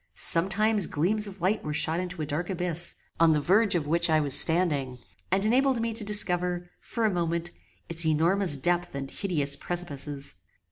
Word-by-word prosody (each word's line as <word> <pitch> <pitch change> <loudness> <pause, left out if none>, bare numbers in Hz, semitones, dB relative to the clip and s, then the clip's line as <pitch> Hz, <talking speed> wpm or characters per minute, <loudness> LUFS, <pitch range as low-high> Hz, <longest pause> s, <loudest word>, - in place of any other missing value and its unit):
Sometimes 195 - +4
gleams 205 +8 +2
of 195 -2 -12
light 195 +5 -1
were 150 0 -4
shot 160 +3 +1
into 180 -3 -5
a - - -3
dark 155 +4 -4
abyss, 175 -2 0 0.2
on 165 -1 +4
the 150 - +1
verge 195 +7 +2
of 165 -4 -1
which 170 +3 0
I 155 -1 +3
was 145 -3 -2
standing, 150 -7 +1 0.3
and 195 +2 +1
enabled 260 +2 +1
me 230 0 -3
to 220 0 -2
discover, 180 -4 +1
for 230 -2 -4
a 215 - +1
moment, 170 0 -3 0.4
its 170 0 +4
enormous 165 +1 +2
depth 175 +2 -2
and 135 -1 -6
hideous 150 -8 -1
precipices. 145 -5 -5
175 Hz, 180 wpm, -26 LUFS, 155-195 Hz, 0.4 s, Sometimes